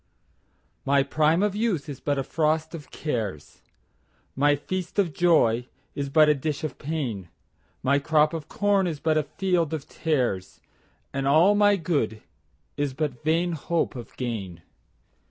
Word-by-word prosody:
1My 140 0 +3
prime 155 +5 +2
of 205 -1 0
youth 205 -9 -1
is 140 -3 -7
but 145 -1 -1
a 135 - 0
frost 155 +2 0
of 155 -3 -8
cares,2My 130 - -4
feast 185 +5 -5
of 185 -6 +2
joy 125 -9 +3 0.3
is 140 -1 -3
but 155 +2 +5
a 150 - +5
dish 145 +1 -3
of 155 -5 -4
pain,3My 140 - -4
crop 155 0 +3
of 160 -2 -5
corn 200 -2 +1
is 155 -4 -3
but 160 0 +1
a 150 - -4
field 175 -5 +1
of 150 - -7
tares,4And 135 - -4
all 160 +8 +5
my 205 0 +4
good 145 - -1 0.5
is 145 -2 -1
but 140 -5 -3
vain 165 +3 +1
hope 165 -1 -1
of 120 -3 -10
gain. 100 -9 -5
150 Hz, 145 wpm, -25 LUFS, 135-165 Hz, 0.5 s, but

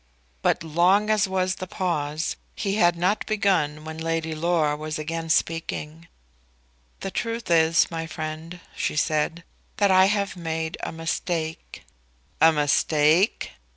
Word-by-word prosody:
But - - +1
long 180 +7 +3
as 215 -1 +3
was 185 -1 0
the 185 - -4
pause, 160 -5 -2 0.2
he 195 -2 -2
had 175 -4 +4
not 185 +5 +1
begun 180 -8 +1
when 160 0 -7
Lady 165 0 -2
Laura 155 -2 +1
was 155 +1 -4
again 165 +1 -4
speaking. 165 0 -1 0.9
"The 195 - -4
truth 230 -3 -3
is, 165 +1 +4
my 165 -1 -4
friend," 160 +2 -6
she - - -2
said, 155 +2 0 0.3
"that 200 -2 +3
I 185 0 +6
have 200 0 0
made 160 -2 -3
a - - -4
mistake." 165 0 -4 0.6
"A 160 - +8
mistake?" 155 +4 +2
165 Hz, 135 wpm, -24 LUFS, 155-185 Hz, 0.9 s, A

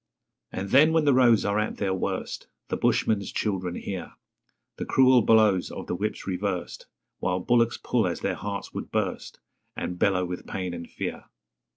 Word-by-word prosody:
And 95 +1 -4
then 155 +4 +6
when 160 -2 +3
the 140 - +5
roads 120 -4 +5
are 100 +1 +1
at 110 - -2
their 95 -2 0
worst, 95 - -3 0.2
The - - 0
bushman's 100 -3 +1
children 95 -4 -2
hear 95 -3 -6 0.6
The - - -4
cruel 130 -1 +5
blows 105 -4 +4
of - - -7
the - - -3
whips 105 +4 -3
reversed 95 -1 -3 0.3
While 90 0 0
bullocks 115 +3 +2
pull 115 -6 0
as 85 - -3
their - - 0
hearts 100 0 -5
would - - -5
burst, - - -3 0.4
And 90 0 -4
bellow 90 -2 +2
with 90 0 -6
pain 90 -2 -4
and 85 -1 -7
fear. - - -5
100 Hz, 175 wpm, -26 LUFS, 90-115 Hz, 0.6 s, then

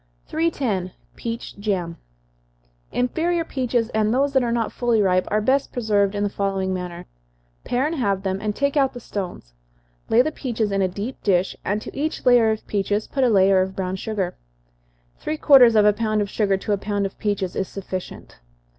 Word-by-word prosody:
310. 250 - -1 0.2
Peach 230 -3 -6
Jam. 185 -5 -2 1.0
Inferior 330 +7 0
peaches, 245 -5 -1
and 215 -1 +1
those 275 +3 +1
that 265 - +4
are 240 -1 0
not 230 -2 0
fully 240 -2 +1
ripe, 185 -2 +2
are 215 +1 +1
best 265 +5 +1
preserved 205 -4 +1
in 205 - 0
the - - +2
following 195 -2 -1
manner: 180 -1 -5 0.6
Pare 250 +3 0
and 310 - -1
halve 200 -6 0
them, 190 0 -2
and 210 -1 -2
take 280 +1 0
out 270 -2 +2
the 245 - -7
stones 180 - -6 0.6
lay 240 +2 +5
the 310 - -1
peaches 230 -8 -2
in 195 0 +1
a 190 - +3
deep 205 +8 -6
dish, 185 -2 +1
and 210 +3 -1
to - - -9
each 305 +1 -3
layer 245 -3 +6
of 220 0 -2
peaches 205 +1 -1
put 270 - -1
a 250 - +4
layer 195 -2 +5
of 190 0 -3
brown 185 -1 -2
sugar. 190 -2 -3 0.8
Three 310 - -3
quarters 255 -7 +7
of 210 -1 +5
a 210 - +6
pound 215 0 0
of 205 -1 -2
sugar 200 -3 +1
to 205 +2 -2
a 200 - 0
pound 205 0 -1
of 195 - -3
the - - -33
peaches, 200 -4 -1
is 190 - -1
sufficient. 185 - -7
210 Hz, 200 wpm, -22 LUFS, 195-245 Hz, 1.0 s, quarters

